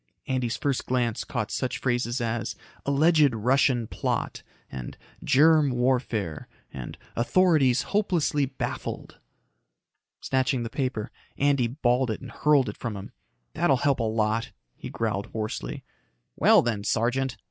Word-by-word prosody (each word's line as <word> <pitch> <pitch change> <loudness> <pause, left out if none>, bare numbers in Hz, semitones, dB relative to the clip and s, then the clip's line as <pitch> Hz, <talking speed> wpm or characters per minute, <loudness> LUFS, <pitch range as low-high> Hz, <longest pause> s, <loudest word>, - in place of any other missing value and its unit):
Andy's 125 -2 -1
first 140 -3 -1
glance 120 -2 0
caught 115 -5 -3
such 130 - -2
phrases 120 0 -1
as 115 -1 -2 0.3
"alleged 145 -2 +4
Russian 125 +1 +2
plot" - - -3 0.3
and 65 -2 -7 0.3
"germ 155 +1 +5
warfare" 120 - -1 0.3
and 65 -2 -7 0.2
"authorities 135 -1 +3
hopelessly 170 -8 +1
baffled." 135 - -5 1.0
Snatching 130 -1 0
the 115 - -5
paper, 125 -6 -2 0.3
Andy 140 -4 +2
balled 125 0 +1
it 110 - -2
and 130 -3 -10
hurled 145 0 +3
it 105 - -5
from 115 -4 -4
him. 95 - -9 0.4
"That'll 135 - +2
help 140 +2 +1
a - - 0
lot," 110 +1 0 0.2
he - - -8
growled 105 -3 -2
hoarsely. 110 -1 -4 0.5
"Well, - - +5
then, 110 -4 -1
Sergeant." 125 +3 0
125 Hz, 130 wpm, -26 LUFS, 115-135 Hz, 1.0 s, germ